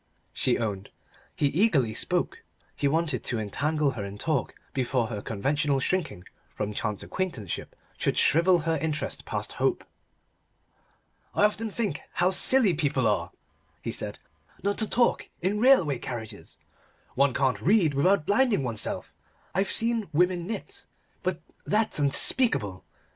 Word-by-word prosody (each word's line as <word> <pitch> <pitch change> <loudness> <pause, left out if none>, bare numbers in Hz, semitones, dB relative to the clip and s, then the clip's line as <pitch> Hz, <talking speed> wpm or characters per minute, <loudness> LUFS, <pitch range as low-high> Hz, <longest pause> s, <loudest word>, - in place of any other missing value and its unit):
she 125 - +2
owned. 100 -4 -3 0.5
He - - +1
eagerly 145 - +2
spoke: - - -1 0.3
he 140 - 0
wanted 155 -2 0
to 120 - 0
entangle 145 +8 0
her 110 -6 -5
in 100 +1 -7
talk 150 +2 -1 0.2
before 125 -2 0
her 105 -3 -4
conventional 140 +7 0
shrinking 155 - -1 0.3
from 105 0 -3
chance 105 -1 -2
acquaintanceship 150 - -4 0.2
should - - 0
shrivel 170 +2 +4
her 160 0 0
interest 155 -1 -3
past - - -4
hope. - - 0 1.5
"I - - +3
often 215 +1 0
think 200 -8 -2
how 180 +1 +2
silly 220 +1 +4
people 145 -5 0
are," 85 -6 +1 0.5
he - - -2
said, - - -1 0.5
"not 200 +1 0
to 220 - 0
talk 240 0 +2
in 200 +4 0
railway 210 - +4
carriages. 110 -5 -7 0.6
One 135 -1 +2
can't 130 -2 +1
read 180 -5 +3
without 160 +4 +3
blinding 205 - +3
oneself. 115 -4 -2 0.4
I've 195 +1 0
seen 230 -4 +1
women 175 +2 +1
knit, 220 - -7 0.3
but - - -2 0.2
that's 215 -5 +1
unspeakable. 140 - +1
150 Hz, 135 wpm, -27 LUFS, 120-190 Hz, 1.5 s, shrivel